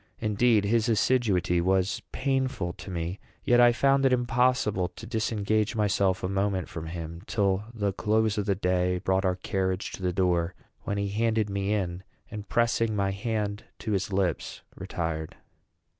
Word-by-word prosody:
Indeed, 110 0 +2
his 115 +2 +2
assiduity 100 -6 +2
was 95 +1 +1
painful 130 -9 -1
to - - -10
me; 85 +1 -3 0.2
yet 120 0 +4
I 120 0 +7
found 135 +3 +3
it 135 - +4
impossible 125 -6 +2
to 90 +4 -11
disengage 110 -1 0
myself 100 -3 +1
a - - +1
moment 95 -1 0
from 80 -2 -7
him, 85 0 -6
till 100 -1 +1
the 100 -4 -1
close 110 +1 +1
of 100 - -2
the 100 - +2
day 90 -1 +1
brought 95 +1 0
our 90 -1 +2
carriage 95 +1 -2
to - - -8
the 90 -1 0
door; 90 -1 +1 0.3
when 100 - -2
he 100 0 -1
handed 110 0 0
me 100 +1 -1
in, 90 -3 -2 0.3
and, 105 -2 -7
pressing 115 -2 +1
my 100 -1 +1
hand 105 0 -3
to 110 - -4
his 100 0 -1
lips, 95 -4 -1
retired. 80 -2 -4
100 Hz, 165 wpm, -27 LUFS, 90-110 Hz, 0.3 s, I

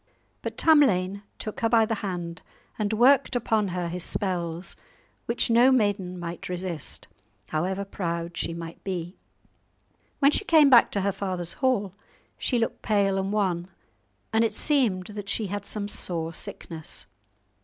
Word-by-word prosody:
'" - - -42
But - - -5
Tamlane 200 - +4 0.2
took 215 - -6
her 225 - +1
by 225 -1 +5
the 225 - -1
hand 175 -3 -4 0.4
and 210 -1 0
worked 250 +4 +4
upon 220 -3 +1
her 180 -1 -2
his 175 +1 -3
spells, 175 -3 -2 0.5
which 235 0 +1
no 240 +3 +6
maiden 205 -7 +1
might 175 0 -6
resist, 180 -4 -5 0.4
however 190 +5 -1
proud 170 -3 -3
she - - -1
might 165 0 -8
be. 180 -2 -4 1.0
When 280 0 +5
she 400 - +1
came 310 -7 +6
back 240 -2 +8
to 200 - +1
her 200 +1 +1
father's 185 -3 -2
hall, 210 -8 +1 0.5
she 250 - +1
looked 230 -1 -1
pale 200 -2 +2
and 195 +1 -2
wan; 185 -5 0 0.7
and 220 +1 +4
it 220 -2 0
seemed 230 -12 +2
that 205 -1 -7
she 220 - -1
had 205 -1 -4
some 205 -1 -4
sore 165 -5 -2
sickness. 160 -1 -6
195 Hz, 155 wpm, -26 LUFS, 175-225 Hz, 1.0 s, back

